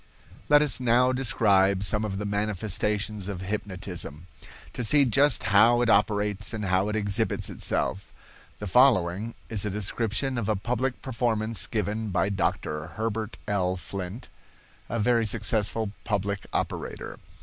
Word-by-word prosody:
Let 150 0 +6
us 145 -4 +2
now 125 +1 +3
describe 100 -6 +2
some 105 +1 +2
of 100 -3 -3
the 105 - -4
manifestations 105 0 -1
of 95 -3 -5
hypnotism, 90 -5 -5 0.5
to 125 - -3
see 140 +5 +4
just 135 +5 +4
how 115 +4 +6
it 120 - +3
operates 105 +1 +1
and 105 -2 -3
how 95 +2 +1
it 105 - -2
exhibits 105 +1 -1
itself. 95 0 -2 0.5
The 105 - -6
following 110 -2 +3
is 110 -4 0
a 105 - -2
description 115 +5 -1
of 110 -2 -3
a 110 - +2
public 125 +5 -2
performance 115 -5 -1
given 110 0 -2
by 95 +1 +1
Dr. 80 -5 -2
Herbert 110 -1 -3
L. 95 -3 0
Flint, 95 +4 -7 0.6
a 115 - -2
very 115 +1 +2
successful 110 0 0
public 100 -2 -2
operator. - - -4
105 Hz, 140 wpm, -26 LUFS, 100-115 Hz, 0.6 s, Let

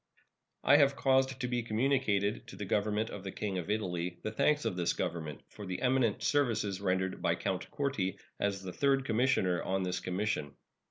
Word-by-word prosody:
I 145 - +7
have 140 -2 +4
caused 130 -1 +2
to 125 - -1
be 120 -1 0
communicated 115 -1 +1
to - - -9
the 105 - -5
Government 105 +3 0
of 100 - -7
the 95 - -5
King 95 -2 -3
of 90 - -6
Italy 90 -4 -2
the 110 - -2
thanks 150 +7 +2
of - - 0
this 85 -2 +1
Government 80 -4 -4
for 105 - -9
the 90 - -3
eminent 125 -4 +2
services 110 -9 +1
rendered 95 -1 0
by - - +2
Count 95 -1 -3
Corti 135 - -1 0.2
as 100 -1 -1
the 90 -1 -6
third 135 -1 +2
commissioner 110 -7 +2
on 95 0 -1
this 90 0 -1
commission. 90 -6 -2
105 Hz, 185 wpm, -32 LUFS, 95-130 Hz, 0.2 s, I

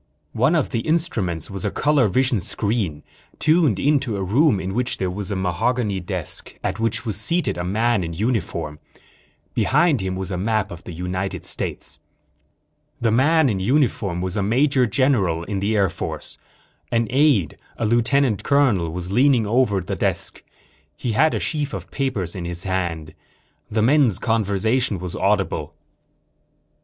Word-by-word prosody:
One - - +2
of - - 0
the - - 0
instruments 115 - -1
was 95 -2 -4
a - - 0
color 145 -5 +2
vision 125 +3 +2
screen, 95 -5 -2 0.3
tuned 155 - +3
in 145 +6 +3
to 120 -7 -3
a 95 - -2
room 120 - +3
in 95 +1 -4
which 125 +3 0
there 95 -1 -1
was 100 +1 -5
a 100 - -2
mahogany 95 +4 0
desk, 90 -3 -3
at - - -2
which 115 +1 -1
was 105 -3 -2
seated 170 +10 0
a 85 - -3
man 110 +3 +1
in 85 - -4
uniform. 85 -7 -2 0.7
Behind 160 - +2
him 95 0 -2
was 95 +1 -4
a 90 - -2
map 110 +1 0
of 85 - -9
the - - -7
United 90 +3 -4
States. - - -2 1.0
The 115 -2 +1
man 145 +6 +4
in 105 -6 0
uniform 105 - +1
was 95 0 -3
a 105 - 0
major 125 +5 +2
general 105 -10 +1
in 100 +2 -3
the 105 +3 0
Air 100 -2 +3
Force. 85 - -4 0.5
An 115 0 +2
aide, 130 - +2 0.2
a - - -1
lieutenant 120 +1 +2
colonel, 125 - +2
was 90 +2 -5
leaning 125 0 +4
over 105 -3 +2
the 90 - -4
desk. - - -2 0.5
He 120 - -2
had 155 +8 +3
a - - 0
sheaf 150 -2 -2
of - - -8
papers 110 - -2
in 90 -2 -5
his 85 +1 -3
hand. 85 -5 -3 0.6
The 110 0 +1
men's 130 - +4
conversation 110 0 +1
was 90 0 -6
audible. - - 0
105 Hz, 165 wpm, -22 LUFS, 95-130 Hz, 1.0 s, man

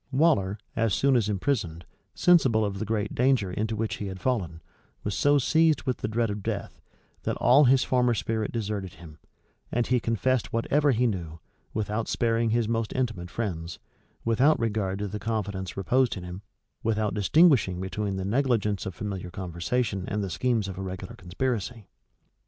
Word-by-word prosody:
[*] - - -40
Waller, 130 - +2 0.2
as 115 -3 +1
soon 135 -1 +3
as 110 -4 +2
imprisoned, 100 - -1 0.3
sensible 130 -11 +4
of 100 -1 -3
the 110 - -2
great 105 -1 -1
danger 125 -7 +2
into 110 +4 -2
which 110 0 -2
he 105 - -4
had 95 -1 -6
fallen, 90 -9 -1 0.4
was 100 - -2
so 145 0 +4
seized 160 +2 +3
with 130 -3 -1
the - - -3
dread 115 0 0
of 100 0 -4
death, - - -4 0.4
that - - -2
all 140 +4 +6
his 130 0 +5
former 125 -2 +2
spirit 110 0 -2
deserted 105 -5 -3
him; 80 -2 -13 0.5
and 120 0 +1
he 125 -1 +2
confessed 115 +2 0
whatever 145 +6 +2
he 125 -1 +2
knew, 85 -8 -3 0.3
without 110 +1 -2
sparing 115 0 +1
his 115 0 +1
most 115 -1 -1
intimate 115 -9 -2
friends, 85 -7 -4 0.5
without 130 +7 +3
regard 105 -4 -1
to 105 +1 -3
the 105 +2 -5
confidence 100 -4 -3
reposed 125 +5 +2
in 90 - -7
him, 90 +2 -7 0.4
without 110 -2 0
distinguishing 110 - +4
between 95 +2 -3
the 95 0 -3
negligence 110 -4 0
of 95 - -6
familiar 95 -3 -5
conversation 95 +4 -2
and 105 0 -2
the 95 - -4
schemes 115 +2 0
of 95 -1 -6
a - - -3
regular 95 -1 -6
conspiracy. 110 +4 -3
110 Hz, 175 wpm, -27 LUFS, 95-125 Hz, 0.5 s, all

